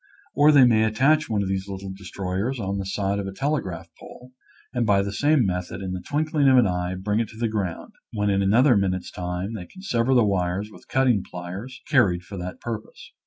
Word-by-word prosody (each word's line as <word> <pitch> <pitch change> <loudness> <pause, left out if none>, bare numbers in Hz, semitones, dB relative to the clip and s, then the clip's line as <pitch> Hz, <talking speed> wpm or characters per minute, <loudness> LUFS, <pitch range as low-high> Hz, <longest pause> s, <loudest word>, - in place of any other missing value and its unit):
Or 145 +2 +5
they 140 -4 +7
may 110 -3 +4
attach 135 +8 +2
one 105 -2 0
of - - -3
these 95 0 -2
little 95 -1 -6
destroyers 95 +5 -4
on 100 -1 -2
the 95 - -4
side 100 0 -1
of 100 - -4
a - - -4
telegraph 115 - -2
pole 125 +1 -13 0.4
and 120 -2 0
by 100 -3 +3
the 100 0 -4
same 145 +2 +3
method 90 0 -3
in 95 -1 -4
the 90 - -4
twinkling 150 - 0
of 130 - +6
an 125 - +6
eye 90 -1 -1
bring 105 +3 0
it 115 - 0
to 110 - -14
the 115 0 0
ground, 100 -6 -4 0.2
when 105 -2 0
in 100 0 +2
another 120 +7 +4
minute's 95 -2 -1
time 90 +4 -4
they 95 -5 -7
can 190 - -14
sever 125 -7 +1
the 120 -3 +5
wires 95 +1 -1
with - - -16
cutting 125 -6 +2
pliers 95 +9 -8
carried 100 - +3
for 100 - -9
that 90 +1 -6
purpose. 115 -2 -7
100 Hz, 220 wpm, -24 LUFS, 95-125 Hz, 0.4 s, they